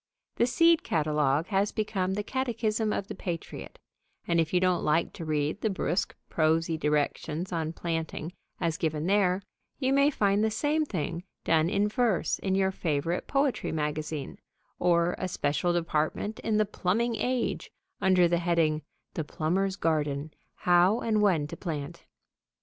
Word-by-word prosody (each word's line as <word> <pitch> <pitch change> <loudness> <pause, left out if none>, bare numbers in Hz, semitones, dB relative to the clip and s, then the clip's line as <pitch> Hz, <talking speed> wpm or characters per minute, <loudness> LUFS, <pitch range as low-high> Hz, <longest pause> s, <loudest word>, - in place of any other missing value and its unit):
The 235 - +3
seed 330 +5 +4
catalogue 150 -1 +1
has 200 0 +1
become 190 -3 -1
the 205 - -2
catechism 225 -3 -1
of 200 - -2
the - - -5
patriot, 170 -4 -6 0.5
and, 170 0 +2
if 160 -1 +1
you 180 - +3
don't 180 -1 +2
like 155 +3 +1
to 170 - -7
read 155 +4 -1
the 220 - +1
brusk, 185 -2 -1
prosy 160 +1 +1
directions 150 +3 -1
on 160 -2 -1
planting 165 0 -4 0.3
as 165 -3 0
given 155 -1 -1
there, 195 -1 +2 0.3
you 265 -1 +1
may 280 +1 +5
find 205 -6 +2
the 220 - +3
same 295 +8 0
thing 170 - -3 0.2
done 160 0 +3
in 205 +1 +2
verse 215 -4 +1
in 190 -1 0
your 190 0 +2
favorite 165 -1 -1
poetry 275 -2 0
magazine, 150 -1 -3 0.4
or 170 0 +3
a 185 - -1
special 150 0 0
department 170 +5 -1
in 220 -1 0
The 215 - +3
Plumbing 220 +4 0
Age 250 -1 -1 0.3
under 185 -2 +5
the 170 0 +1
heading 165 -3 +1 0.3
"The 160 - -2
Plumber's 185 +6 -1
Garden: 150 -4 -1 0.2
How 180 +5 +3
and 215 -2 +1
When 180 -8 +3
to 150 - -7
Plant." 150 -6 -5
175 Hz, 155 wpm, -28 LUFS, 155-210 Hz, 0.5 s, may